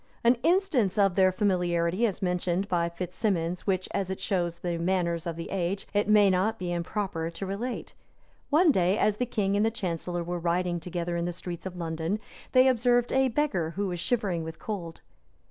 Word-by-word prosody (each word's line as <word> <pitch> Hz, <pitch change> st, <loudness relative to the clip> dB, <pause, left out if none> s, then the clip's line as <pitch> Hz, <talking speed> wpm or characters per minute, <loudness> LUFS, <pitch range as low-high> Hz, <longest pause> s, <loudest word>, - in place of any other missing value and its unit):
An 235 Hz, +1 st, +6 dB
instance 305 Hz, -, +2 dB
of 195 Hz, -2 st, +4 dB
their 185 Hz, 0 st, +4 dB
familiarity 180 Hz, +1 st, +1 dB
is 195 Hz, -2 st, -4 dB
mentioned 180 Hz, +1 st, 0 dB
by 170 Hz, -3 st, +1 dB
Fitz 180 Hz, +1 st, -6 dB
Stephens 180 Hz, -4 st, -1 dB
which, 185 Hz, -1 st, +1 dB
as 195 Hz, -2 st, -1 dB
it 190 Hz, -, -3 dB
shows 175 Hz, -4 st, -1 dB
the 170 Hz, -1 st, -3 dB
manners 170 Hz, -1 st, 0 dB
of 170 Hz, -, -3 dB
the 165 Hz, 0 st, -7 dB
age, 195 Hz, +1 st, -1 dB
it 205 Hz, 0 st, +1 dB
may 210 Hz, -1 st, +6 dB
not 200 Hz, +5 st, +1 dB
be 180 Hz, -3 st, -3 dB
improper 170 Hz, -1 st, -2 dB
to 170 Hz, +4 st, -6 dB
relate. 220 Hz, +6 st, -4 dB, 0.6 s
One 315 Hz, +2 st, +5 dB
day, 185 Hz, -3 st, +2 dB
as 210 Hz, -1 st, +2 dB
the 250 Hz, -, -1 dB
king 200 Hz, -4 st, 0 dB
and 205 Hz, -, +3 dB
the 225 Hz, -, +3 dB
chancellor 175 Hz, -4 st, -3 dB
were 175 Hz, +1 st, -3 dB
riding 175 Hz, +1 st, 0 dB
together 175 Hz, 0 st, -3 dB
in 170 Hz, -, -1 dB
the 175 Hz, -, -1 dB
streets 175 Hz, +1 st, -6 dB
of 185 Hz, -, -8 dB
London, 165 Hz, +3 st, -2 dB, 0.3 s
they 255 Hz, 0 st, +6 dB
observed 245 Hz, -1 st, +3 dB
a 265 Hz, 0 st, +4 dB
beggar, 220 Hz, -, 0 dB
who 200 Hz, +1 st, -1 dB
was 175 Hz, -1 st, -4 dB
shivering 190 Hz, -4 st, 0 dB
with 160 Hz, 0 st, -7 dB
cold. 175 Hz, -6 st, -6 dB
185 Hz, 195 wpm, -28 LUFS, 170-210 Hz, 0.6 s, An